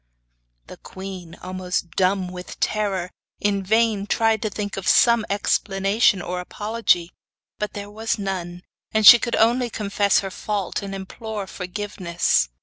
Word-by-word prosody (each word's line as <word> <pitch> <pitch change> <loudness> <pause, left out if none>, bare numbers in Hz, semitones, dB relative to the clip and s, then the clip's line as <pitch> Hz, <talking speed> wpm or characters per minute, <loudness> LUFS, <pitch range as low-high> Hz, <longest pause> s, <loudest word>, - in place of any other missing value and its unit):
The - - -12
queen, 185 -3 -9
almost 180 -2 -3
dumb 185 0 +1
with 180 0 -9
terror, 195 -4 -1 0.3
in 200 -1 0
vain 215 0 +1
tried 225 0 +2
to 215 - -1
think 205 0 -4
of 195 - -5
some 235 -2 +5
explanation 195 0 +1
or 180 +1 -3
apology; 205 -2 0 0.5
but 210 - -3
there 205 0 -7
was 220 +2 -2
none, 180 -3 -4 0.3
and 215 -1 +2
she 240 - +11
could 235 - -1
only 240 +2 +3
confess 200 -2 +1
her 195 -1 -5
fault 205 0 -3
and 195 -1 -6
implore 205 +2 -6
forgiveness. 180 - -1
200 Hz, 145 wpm, -22 LUFS, 185-215 Hz, 0.5 s, she